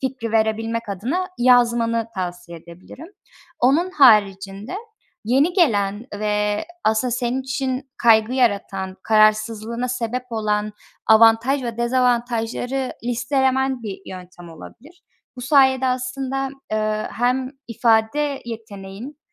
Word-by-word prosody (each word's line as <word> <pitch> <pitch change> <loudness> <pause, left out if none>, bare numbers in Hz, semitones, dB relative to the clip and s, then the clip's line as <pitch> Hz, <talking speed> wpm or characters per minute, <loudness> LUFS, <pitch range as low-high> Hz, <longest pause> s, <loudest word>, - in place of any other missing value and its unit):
fikri 255 -4 -4
verebilmek 225 +1 0
adına 255 - -2
yazmanı 235 -2 +3
tavsiye 175 -2 -6
edebilirim. 170 - -13 0.5
Onun 295 +9 +3
haricinde 205 - +3 0.5
yeni 270 +9 +2
gelen 215 - +1
ve 210 +2 -1 0.2
aslında 220 +3 +1
senin 245 +1 -1
için 260 0 -3
kaygı 225 0 +4
yaratan, 200 -6 -1
kararsızlığına 215 +2 +1
sebep 250 0 -3
olan 210 -2 -1 0.3
avantaj 225 +5 +5
ve 235 -2 -5
dezavantajları 245 +1 0
listelemen 265 +1 0
bir 205 -3 -6
yöntem 180 -1 -11
olabilir. 275 - -14 0.3
Bu - - -7
sayede 265 0 +3
aslında, 265 +1 -2 0.2
eee, 215 0 -1
hem 255 +2 0 0.2
ifade 235 +5 +1
yeteneğin, 220 +3 -9
235 Hz, 100 wpm, -21 LUFS, 215-260 Hz, 0.5 s, avantaj